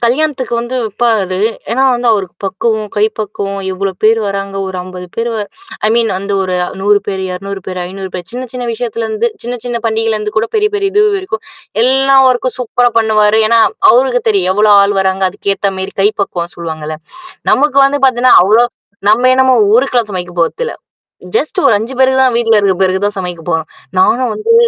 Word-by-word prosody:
கல்யாணத்துக்கு 260 0 0
வந்து 240 +2 -3
வப்பாரு. 210 -4 0 0.3
ஏன்னா 260 +3 +1
வந்து 240 0 -2
அவருக்கு 190 -4 -2
பக்குவம் 215 +2 -2
கை 205 - +3
பக்குவம், 200 -2 -4
எவ்ளோ 195 +1 -2
பேர் 225 +1 +4
வராங்க 195 0 -4
ஒரு 190 - -5
50 180 0 -9
பேர் 230 +1 -1
வ - - -3 0.5
ஐ - - +3
மீன் 230 -1 +2
அந்த 200 +1 -4
ஒரு 185 -1 -2 0.3
100 205 +1 +3
பேரு, 190 -2 -3
200 195 +2 -6
பேரு, 185 -1 -5
500 190 0 -7
பேரு. 180 -2 -6
சின்ன, 255 +1 -5
சின்ன 250 -1 -5
விஷயத்துலருந்து 230 -1 -2 0.2
சின்ன, 245 +1 -3
சின்ன 240 -1 -2
பண்டிகையிலருந்து 220 -1 -1
கூட 220 +1 +1
பெரிய, 425 0 +2
பெரிய 400 -1 -1
இது 415 - +4
வரைக்கும். 375 - -5 0.4
எல்லா 270 +1 +4
ஒர்கக்கும் 255 0 -1
சூப்பரா 245 0 +1
பண்ணுவாரு. 215 -1 +3
ஏன்னா 230 0 +4 0.3
அவருக்கு 250 0 +2
தெரியும். 195 -4 +2
எவ்வளோ 210 +1 +4
ஆள் 200 0 +1
வராங்க? 190 0 0
அதுக்கு 200 +1 -2
ஏத்த 195 0 -1
மேரி 190 0 -5
கை 205 - +5
பக்குவம் 175 -3 -4
சொல்லுவாங்கள்ல. 155 -2 -6 0.6
நமக்கு 280 0 +3
வந்து 285 +1 0
பார்த்தீங்கன்னா, 255 0 +4
அவ்ளோ 220 +5 +4 0.5
நம்ம 245 +4 +3
என்னமோ 260 -1 +4 0.2
ஊருக்குல்லாம் 240 -3 +2
சமைக்க 180 -1 -5
போறதில்ல. 465 - -2 0.6
ஜஸ்ட் 310 - -1
ஒரு 230 - +4
5 230 +5 -5
பேருக்கு 265 0 +3
தான், 255 -2 +2
வீட்ல 225 -2 +2
இருக்கிற 195 -3 +2
பேருக்கு 190 +2 0
தான் 205 - -6
சமைக்க 175 -2 -6
போறோம். 160 -1 -2 0.3
நாங்க 240 +7 +2
வந்து 455 +2 0
220 Hz, 180 wpm, -13 LUFS, 195-245 Hz, 0.6 s, கை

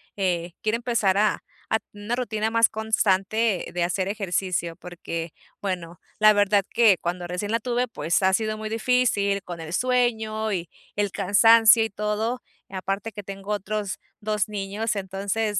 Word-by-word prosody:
eh, 175 -3 -1
quiero 215 +1 +1
empezar 235 -5 +1
a 215 - +1 0.3
a 220 - +2
tener 205 -1 -14
una 235 - 0
rutina 220 -3 -1
más 230 0 +4
constante 215 -1 +1
de 175 - 0
hacer 185 +2 -1
ejercicio, 185 -4 -2
porque, 170 -2 -6 0.3
bueno, 180 -3 -4 0.2
la 215 0 +7
verdad 205 -1 +3
que 225 -5 +5
cuando 175 +1 -3
recién 180 +4 -3
la 230 - +2
tuve, 245 +2 -1
pues, 170 -4 0
ha 190 - +4
sido 215 +1 0
muy 215 0 -5
difícil 220 -4 +1
con 175 -1 -7
el 160 0 -7
sueño 220 -2 +1
y 175 -2 -3 0.3
el 205 -1 0
cansancio 225 +4 +6
y 220 - -2
todo, 210 +4 -2 0.3
aparte 195 +3 -3
que 205 - -7
tengo 195 +1 -7
otros 210 -1 -3 0.2
2 210 0 0
niños. 210 +2 -3
Entonces, 200 +2 -2
205 Hz, 160 wpm, -25 LUFS, 190-220 Hz, 0.3 s, la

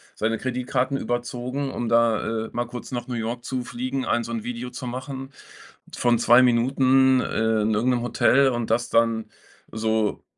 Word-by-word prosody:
seine 115 0 -1
Kreditkarten 130 +1 -1
überzogen, 125 +3 -3
um 120 - -3
da, 115 -1 +1
äh, - - -9
mal 120 0 -1
kurz 120 +1 -9
nach 120 -2 -3
New 125 - -5
York 120 +1 -3
zu 130 -2 -3
fliegen, 255 - -4
ein 120 - +1
so 115 - -7
'n 115 -2 -3
Video 125 +1 -5
zu 125 0 -7
machen 135 +2 -6 0.6
von 120 -1 +2
2 120 +2 +6
Minuten, 130 +2 +4
äh, 110 -2 0
in 110 +1 +1
irgendeinem 120 +3 +1
Hotel 135 +2 +3
und 120 -3 -2
das 120 +1 +1
dann 115 -1 +1 0.4
so 110 -1 -1
120 Hz, 175 wpm, -24 LUFS, 115-130 Hz, 0.6 s, 2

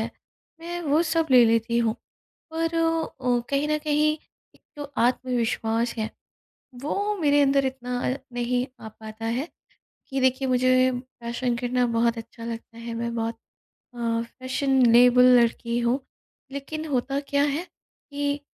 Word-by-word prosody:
है, - - -3 0.5
मैं 345 +1 -5
वो 305 +2 +3
सब 325 -1 +1
ले 250 -2 +8
लेती 230 +1 +2
हूँ 225 -1 +1 0.6
पर 330 0 -1
अ, 320 -7 0
कहीं 280 +2 +1
न 305 0 +1
कहीं 300 0 +2 0.4
एक - - -24 0.2
तो 290 - -5 0.2
आत्मविश्वास 235 -2 0
है, 220 0 -2 0.7
वो 405 +8 -1
मेरे 290 -1 +4
अंदर 275 -1 +3
इतना 250 -1 -3 0.2
अ, - - -6 0.2
नहीं 245 +1 0 0.2
आ - - -6
पाता 220 +1 -9
है, 245 +8 -1 0.6
कि 270 -1 -2
देखिए 260 +1 +2
मुझे 255 0 +4
फैशन 245 -1 -4
करना 245 0 0
बहुत 235 0 +2
अच्छा 230 +1 -9
लगता 230 0 -7
है 230 0 -6
मैं 235 0 -3
बहुत 230 0 -2 0.6
अ, 230 -1 -1 0.2
फैशनेबल 250 -2 +5 0.2
लड़की 235 0 0
हूँ। 240 +3 +1 0.5
लेकिन 310 +3 -5
होता 275 0 -1
क्या 285 0 +2
है 290 +3 0 0.5
कि 285 0 -2
255 Hz, 145 wpm, -25 LUFS, 235-285 Hz, 0.7 s, ले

